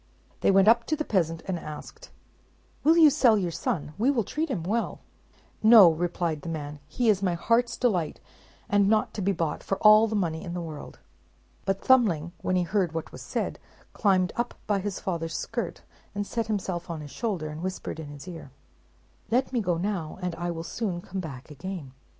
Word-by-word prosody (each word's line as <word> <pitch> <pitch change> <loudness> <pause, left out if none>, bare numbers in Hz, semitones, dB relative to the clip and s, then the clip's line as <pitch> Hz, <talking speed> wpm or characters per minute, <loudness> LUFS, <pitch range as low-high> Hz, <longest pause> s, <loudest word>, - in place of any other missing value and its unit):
They - - +2
went 195 +1 +5
up 230 +1 +5
to 310 - +1
the 305 0 -3
peasant, 165 -5 0
and 185 -3 -2
asked, 310 - -9 0.7
"Will 320 +3 +5
you 315 -3 +8
sell 245 -6 +4
your 180 -4 -1
son? 150 -2 -3
We 240 +5 +3
will 250 -6 +2
treat 310 - -3
him 205 -11 -2
well." 220 +7 -2 0.6
"No," 215 -6 +9
replied 170 -1 -2
the 165 - -6
man; 150 -2 -5
"he 245 +6 -1
is 205 -3 +4
my 180 -3 +1
heart's 230 +7 +1
delight, 185 -11 0 0.5
and 200 -1 +3
not 215 0 +2
to 210 - -4
be 195 +1 +2
bought 165 -4 -2
for 195 - -2
all 215 +1 +7
the 220 - -2
money 165 -5 -1
in 175 0 -5
the - - -2
world!" 160 -3 -8 0.7
But 195 0 -1
Thumbling, 195 -11 +4
when 185 - 0
he 180 - +2
heard 180 -1 0
what 165 -1 -4
was - - -10
said, - - -3 0.3
climbed 185 -3 +2
up 240 +1 -2
by 205 -2 +1
his 195 0 -4
father's 165 -3 -3
skirt, 225 -3 -4 0.3
and 205 0 -2
set 230 +1 -2
himself 190 -5 -3
on 165 -2 -4
his 145 -2 -9
shoulder, 190 -10 -3
and 155 +1 -7
whispered 185 -3 -4
in 160 - -6
his 145 +3 -10
ear, 165 -6 -8 0.8
"Let 255 +3 +1
me 240 - +1
go 175 -4 0
now, 175 -4 -3
and 180 -1 -1
I 175 +1 -3
will 165 -1 -4
soon 180 0 -3
come 190 +2 -6
back 140 -4 -9
again." 160 -2 -7
185 Hz, 205 wpm, -27 LUFS, 165-220 Hz, 0.8 s, No